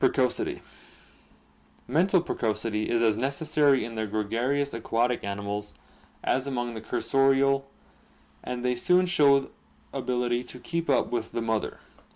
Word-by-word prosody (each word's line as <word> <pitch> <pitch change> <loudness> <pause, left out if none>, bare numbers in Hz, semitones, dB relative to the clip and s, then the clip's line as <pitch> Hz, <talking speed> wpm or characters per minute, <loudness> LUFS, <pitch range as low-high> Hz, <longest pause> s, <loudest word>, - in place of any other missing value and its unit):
Precocity. 130 -2 +1 0.6
— - - -33
Mental 175 +7 +3
precocity 110 -7 -2
is 115 -1 +2
as 110 -2 +3
necessary 140 +2 +2
in 115 - -7
the 110 -1 -2
gregarious 120 +7 -1
aquatic 115 +2 0
animals 100 +1 -4 0.5
as 130 +1 0
among 120 -3 -2
the 110 - -6
cursorial, 135 +2 +2 0.8
and 125 0 -4
they 125 0 +2
soon 180 +9 +3
show 140 -6 +3 0.4
ability 125 -1 -1
to 125 - -11
keep 170 +5 -3
up 135 - +2
with 120 -2 -3
the 115 - -1
mother. 110 -2 -2
125 Hz, 135 wpm, -27 LUFS, 115-140 Hz, 0.8 s, Mental